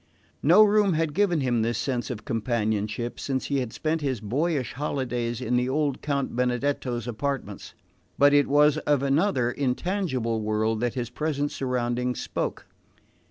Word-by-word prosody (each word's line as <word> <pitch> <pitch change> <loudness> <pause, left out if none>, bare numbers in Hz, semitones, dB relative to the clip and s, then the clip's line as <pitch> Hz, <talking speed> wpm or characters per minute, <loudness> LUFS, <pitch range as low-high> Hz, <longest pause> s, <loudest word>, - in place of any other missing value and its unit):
No 175 +9 +7
room 205 -2 +4
had 160 -1 0
given 175 -3 +2
him 120 -3 +1
this 115 0 0
sense 120 -3 -2
of 105 -4 -6
companionship 110 -1 -1
since 135 -2 -2
he 140 -1 0
had 125 -3 -3
spent 160 0 -1
his 135 -5 -1
boyish 135 +4 -1
holidays 125 -4 -2
in 125 -1 0
the 125 +1 0
old 145 -1 0
Count 140 -4 -2
Benedetto's 125 -1 -1
apartments; 120 -3 -4 0.4
but 145 0 +5
it 145 0 +4
was 150 +1 +4
of 145 -3 +1
another, 140 -3 +2
intangible 130 - -1
world 110 +1 0
that 120 +1 -1
his 120 -2 -3
present 145 +1 -2
surroundings 125 -1 -1
spoke. - - -3
130 Hz, 155 wpm, -26 LUFS, 120-145 Hz, 0.4 s, No